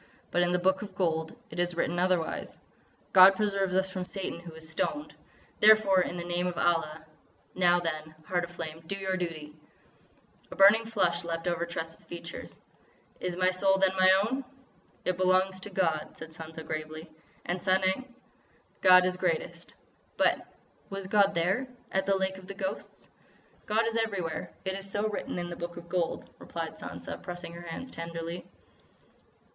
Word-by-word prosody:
But 175 - +2
in 175 0 +3
the 180 - +3
Book 190 +1 +2
of 200 -3 -8
Gold 160 -1 0 0.2
it - - -6
is 175 0 +1
written 175 +1 0
otherwise: 180 -3 0 0.6
'God 190 +1 +9
preserve 195 -2 +1
us 190 0 +1
from 185 -1 -3
Satan 185 -2 -5
who 170 -1 -10
was 160 0 -11
stoned!'... 295 - -2 0.5
Therefore, 210 -3 +7
in 180 - -2
the 170 - -3
name 175 +1 0
of 180 - -3
Allah! 165 -2 +1 0.5
Now 175 -1 +4
then, 155 -2 -4
Heart 175 0 0
of - - -14
Flame, 160 -2 -6
do 195 - -2
your 190 -1 -1
duty!" 160 -4 -5 0.9
A - - -8
burning 210 +4 +7
flush 180 -6 +1
leaped 165 -1 -4
over 170 -1 0
Tressa's 165 -1 -6
features. 170 -1 -9 0.6
"Is 180 -1 -3
my 185 0 +4
soul, 195 +1 +3
then, 190 -1 +4
my 185 0 +6
own!" 260 +5 -2 0.6
"It 185 -1 0
belongs 185 +1 +3
to 195 - -7
God," 170 -5 -1
said 160 0 -9
Sansa 160 0 -8
gravely. 155 +1 -5 0.4
"And—Sanang?" 190 +7 +1 0.7
"God 180 -1 +8
is 180 0 0
greatest." 170 -1 -2 0.4
"But—was 195 -1 -2
God 200 +1 +3
there—at 195 +3 -1
the 195 - +4
Lake 190 0 -1
of 185 - -14
the 200 - -7
Ghosts?" 195 0 -6 0.6
"God 220 +2 +2
is 225 0 -1
everywhere. 195 -8 -2
It 190 - 0
is 195 0 -6
so 205 +2 0
written 210 - -4
in 175 0 -3
the - - -4
Book 170 0 -6
of 170 0 -10
Gold," 175 -2 -1
replied - - -6
Sansa, - - -7
pressing 175 -1 -7
her 170 - -8
hands 175 +10 -7
tenderly. 165 +1 -5
180 Hz, 165 wpm, -29 LUFS, 170-195 Hz, 0.9 s, God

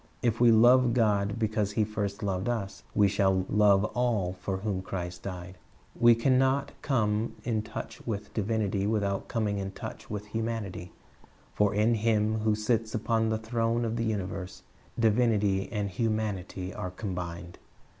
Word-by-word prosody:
If 115 -1 +1
we 120 - +7
love 120 +2 +6
God 105 -3 +2
because 110 -2 0
He 110 - +2
first 105 -1 -3
loved 95 +2 -1
us, 105 -5 -3
we 105 -1 +5
shall 95 -1 +2
love 105 -1 +4
all 115 -7 0
for 95 +1 -2
whom 95 -1 -2
Christ 90 -2 -5
died. 90 -1 -7 0.4
We 120 0 +6
can 130 +3 +3
not 135 +1 +1
come 110 -4 0
in 110 -3 0
touch 105 0 -7
with 105 -2 -4
divinity 105 -2 0
without 100 -3 -1
coming 105 -4 -1
in 95 0 -4
touch - - -8
with 105 0 -4
humanity; 110 -5 -4 0.6
for 105 -1 +2
in 110 +3 +3
Him 110 -1 +1
who 110 0 +2
sits 110 +1 0
upon 110 0 +1
the 110 - +1
throne 115 +1 0
of 115 0 -2
the 115 - -1
universe, 95 -4 -4 0.3
divinity 105 -4 +2
and 105 -2 -1
humanity 100 -3 -2
are 90 - -4
combined. 90 -3 -6
105 Hz, 155 wpm, -29 LUFS, 100-115 Hz, 0.6 s, we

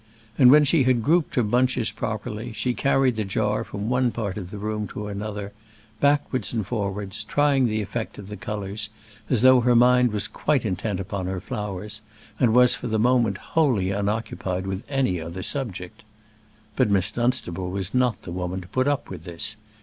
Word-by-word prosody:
And 125 0 +7
when 150 +3 +8
she 150 +1 +3
had 125 -3 +2
grouped 165 +5 +2
her 125 - +3
bunches 125 +1 +1
properly 110 +1 -4
she 110 +4 -1
carried 135 -2 +2
the 110 - 0
jar 105 +2 0
from 100 +1 -5
one 125 +1 +2
part 105 -5 -3
of 95 -4 -6
the 105 - -7
room 105 0 -3
to 105 - -6
another, 105 0 -5 0.5
backwards 140 -3 +1
and 110 -4 -1
forwards, 100 -2 -3
trying 140 +1 +2
the 110 -1 -1
effect 110 +3 -5
of 100 - -9
the 105 - -6
colours, 105 +1 -5 0.4
as 125 -3 +1
though 130 -1 +7
her 120 0 +3
mind 125 0 +5
was 105 -1 -1
quite 145 -5 0
intent 100 0 -2
upon 95 -1 -4
her 95 0 -3
flowers, 105 -1 -5 0.4
and 120 -3 +3
was 125 0 +6
for 125 - -4
the 110 -1 0
moment 115 -3 +2 0.2
wholly 120 - +2
unoccupied 100 -2 -2
with 95 +2 -4
any 130 - 0
other 85 +3 -6
subject. 100 -10 -4 0.7
But - - +2
Miss 100 -1 +2
Dunstable 120 -8 -1
was 95 +1 -4
not 125 -5 +1
the 85 - -7
woman 90 +1 -3
to 90 - -12
put 130 +1 0
up 145 -1 0
with - - -7
this. 110 +6 -3
110 Hz, 190 wpm, -24 LUFS, 100-125 Hz, 0.7 s, when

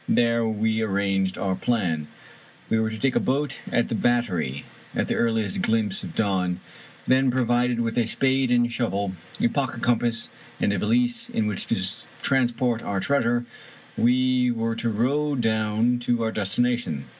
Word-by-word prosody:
There 115 -1 +3
we 110 +1 0
arranged 100 -2 0
our 95 -1 -1
plan. 90 -9 -1 0.6
We 110 - +3
were 110 0 +1
to 110 - -5
take 135 +3 0
a - - +4
boat 140 +1 -1
at 120 - +2
the - - -4
Battery, 105 - 0 0.3
at - - 0
the - - 0
earliest 110 -4 0
glimpse 110 -3 +1
of - - -8
dawn; 95 -4 0 0.5
then, 130 0 +3
provided 120 -1 +1
with 115 +1 0
a 115 - +1
spade 130 +2 +1
and 120 -1 +3
shovel, 100 -5 -1 0.3
a - - +3
pocket 135 +1 -2
compass 120 -1 +1 0.3
and 100 - +1
a - - -1
valise 120 +3 +1
in 110 - -1
which 105 -2 -3
to - - +1 0.5
transport 120 -3 +1
our 100 -1 -2
treasure, 120 0 +1 0.5
we 125 +1 +3
were 115 -1 -1
to 115 - -1
row 140 +7 0
down 110 0 +1
to 120 -1 0
our 110 - 0
destination. 110 - 0
115 Hz, 165 wpm, -24 LUFS, 105-125 Hz, 0.6 s, a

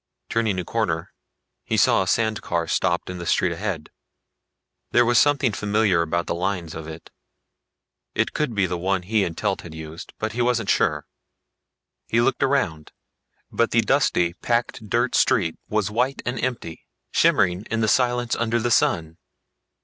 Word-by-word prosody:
Turning 110 -4 0
a 90 - -3
corner, - - -2 0.5
he - - -1
saw - - +4
a - - -2
sand 110 -2 +1
car 85 -1 -2
stopped - - 0
in 90 -1 -6
the 85 - -6
street 90 - +2
ahead. 85 -3 -4 1.0
There 120 - +4
was 120 -1 +4
something 140 -3 +3
familiar 105 -3 +1
about 85 +1 -1
the - - -2
lines 90 -2 -2
of 80 0 -7
it. 80 0 -10 1.0
It - - 0
could 145 -7 -1
be 100 -2 +2
the 90 -1 -3
one 95 +1 0
he 105 +2 +1
and 85 -3 -4
Telt 100 -3 -1
had 80 -2 -10
used, 80 +1 -9
but 110 0 -3
he 120 +2 -2
wasn't 120 -4 +1
sure. - - +1 1.0
He 115 - +1
looked 125 +2 +1
around, 105 - 0 0.6
but 115 - +1
the 115 - +3
dusty, 110 -9 +2
packed 115 -3 -1
dirt - - +1
street 80 - +2
was 105 -1 0
white 125 +5 0
and 120 0 -3
empty, 120 -10 -4 0.2
shimmering 90 +4 +2
in 115 -1 0
silence 120 0 +2
under 115 0 0
the 120 +1 -1
sun. 80 -6 +1
105 Hz, 165 wpm, -23 LUFS, 85-120 Hz, 1.0 s, saw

